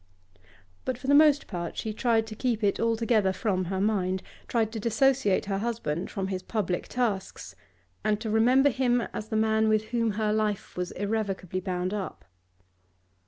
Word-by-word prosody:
But 255 -2 -2
for 255 - -11
the 280 - +3
most 295 -1 +6
part, 175 -3 -5
she 220 - -3
tried 225 0 +2
to 220 -1 -8
keep 235 -1 -1
it 200 - +2
altogether 230 -3 +2
from 185 -2 -1
her 190 +2 -2
mind, 190 -2 0 0.2
tried 225 -2 0
to 225 - -4
dissociate 235 -1 +2
her 195 -1 -1
husband 205 -7 -2
from 195 -2 -3
his 185 -1 -3
public 185 -3 -2
tasks, 225 -6 -2 0.5
and 210 -1 +1
to 220 -1 -3
remember 255 +6 +4
him 245 -1 +2
as 215 - -5
the 220 - -2
man 220 0 +2
with 215 0 +1
whom 230 -3 0
her 210 0 0
life 215 -2 -1
was 180 -1 -2
irrevocably 200 -3 -2
bound 185 0 -2
up. 200 -3 -5
215 Hz, 170 wpm, -27 LUFS, 195-230 Hz, 0.5 s, most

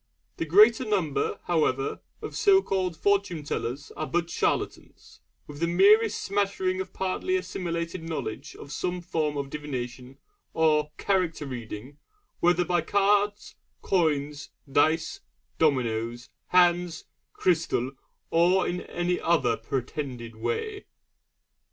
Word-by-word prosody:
The 165 - -2
greater 215 - +6
number, 190 - 0
however, 145 -6 0 0.2
of - - -6
so 400 -3 +5
called 185 -3 -1
Fortune 200 -5 +1
tellers 140 0 -4
are 155 - -3
but 170 -1 -1
charlatans, - - -3 0.3
with 145 -1 -10
the 170 - +1
merest 210 +5 +5
smattering 195 -2 0
of 190 - -7
partly 190 - -1
assimilated 170 - -3
knowledge 155 -4 -5
of 140 - -11
some 180 +2 -2
form 155 -4 -1
of 140 -1 -4
divination 130 -3 -6 0.4
or 155 -2 +3
'character 180 -6 0
reading'; 125 +1 -7 0.4
whether 175 0 +3
by 175 +1 +2
the - - -15
cards, 205 +1 +2 0.3
coins, 150 -5 0 0.2
dice, 160 +3 +2 0.4
dominoes, 120 -5 0 0.2
hands, 175 -2 +3 0.3
crystal, 160 -7 +1 0.4
or 175 +3 +4
in 180 0 -2
any 175 0 -2
other 170 -1 +2
pretended 125 -3 -4
way. 430 - -3
165 Hz, 120 wpm, -27 LUFS, 145-185 Hz, 0.4 s, greater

